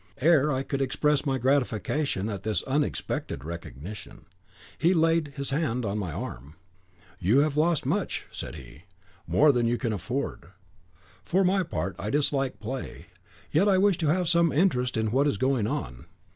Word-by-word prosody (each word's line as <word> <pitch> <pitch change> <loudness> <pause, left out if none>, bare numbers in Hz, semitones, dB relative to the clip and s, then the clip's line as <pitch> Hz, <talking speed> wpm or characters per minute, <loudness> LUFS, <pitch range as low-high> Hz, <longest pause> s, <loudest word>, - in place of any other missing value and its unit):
Ere 150 0 +4
I 130 0 -1
could 140 0 -3
express 150 +2 +1
my 135 -1 +1
gratification 130 -3 0
at 100 -4 -4
this 110 -1 -1
unexpected 140 - -2
recognition, 85 - -8 0.5
he 175 +3 +3
laid 165 -2 +2
his 140 -1 -3
hand 130 -5 0
on 100 +1 -1
my 90 -5 -3
arm. 70 +1 -7 0.6
'You 110 +10 +4
have 150 -1 0
lost 160 -1 +2
much,' 185 +8 -1
said - - -7
he; 70 +6 -12 0.4
'more 150 0 +5
than 120 -3 +1
you 120 +1 +1
can 115 -4 -1
afford. 120 +3 -4 0.8
For 180 - +2
my 190 +1 +3
part, 95 - -3
I 105 - -3
dislike 135 -4 0
play; 125 +5 -6 0.4
yet 195 +7 +3
I 190 - +4
wish 195 -2 +3
to 160 - 0
have 175 +3 +2
some 170 -1 +3
interest 125 -6 +1
in 110 -1 0
what 135 +4 +3
is 125 - 0
going 130 -2 +1
on. - - -4
135 Hz, 170 wpm, -27 LUFS, 110-155 Hz, 0.8 s, more